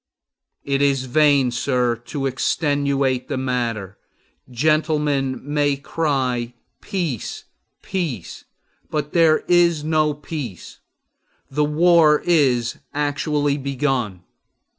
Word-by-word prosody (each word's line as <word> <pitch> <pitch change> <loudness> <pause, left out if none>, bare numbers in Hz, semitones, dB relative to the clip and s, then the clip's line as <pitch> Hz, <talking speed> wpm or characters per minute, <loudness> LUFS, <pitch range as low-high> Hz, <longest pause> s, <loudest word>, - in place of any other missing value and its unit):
It 140 0 0
is 140 -2 +2
in 130 - -10
vain, 145 -4 +4
sir, 120 0 0
to 140 -3 -3
extenuate 135 -1 0
the - - -3
matter. 120 -7 -3 0.5
Gentlemen 150 0 +1
may 145 0 +1
cry, 130 -5 -1 0.3
Peace, 175 - -4 0.4
peace! 155 - -4 0.4
but 150 -1 -3
there 165 -2 +4
is 170 -3 +3
no 155 -1 +1
peace. 145 - -7 0.7
The 150 +2 +1
war 155 0 +4
is 130 -8 +2 0.2
actually 145 0 0
begun! 130 -8 -2
140 Hz, 95 wpm, -21 LUFS, 130-150 Hz, 0.7 s, vain